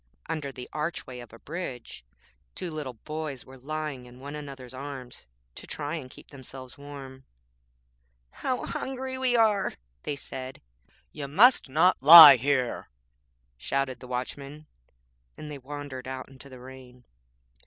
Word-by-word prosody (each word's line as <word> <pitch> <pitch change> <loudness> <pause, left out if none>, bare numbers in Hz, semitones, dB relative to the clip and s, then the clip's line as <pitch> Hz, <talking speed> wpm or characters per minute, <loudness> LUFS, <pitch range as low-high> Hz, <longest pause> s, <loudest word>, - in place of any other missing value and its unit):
Under 155 -4 -4
the 125 -2 -9
archway 150 -5 -4
of 120 -2 -11
a 115 - -13
bridge 130 - -7 0.5
two 180 - -5
little 145 -5 -6
boys 150 +1 -6
were 130 0 -14
lying 150 -2 -5
in 125 +1 -15
one 140 +2 -8
another's 135 -4 -8
arms 130 - -8 0.3
to - - -10
try 145 0 -4
and 145 -6 -5
keep - - -15
themselves 130 -2 -10
warm. 140 -2 -10 1.1
'How 255 -1 -3
hungry 260 0 -4
we 255 -2 +1
are' 215 -4 +3 0.3
they 145 - -3
said. 130 -1 -7 0.5
'You 145 -2 -6
must 210 - +5
not 165 +5 +3
lie 150 -1 +12
here,' 130 -1 -1 0.7
shouted 130 - -2
the 125 - -11
Watchman, 140 +4 -6 0.7
and 150 - -8
they 145 - -7
wandered 135 -1 -8
out 130 0 -6
into 135 +1 -14
the 130 -1 -12
rain. 125 -1 -13
140 Hz, 145 wpm, -27 LUFS, 130-155 Hz, 1.1 s, lie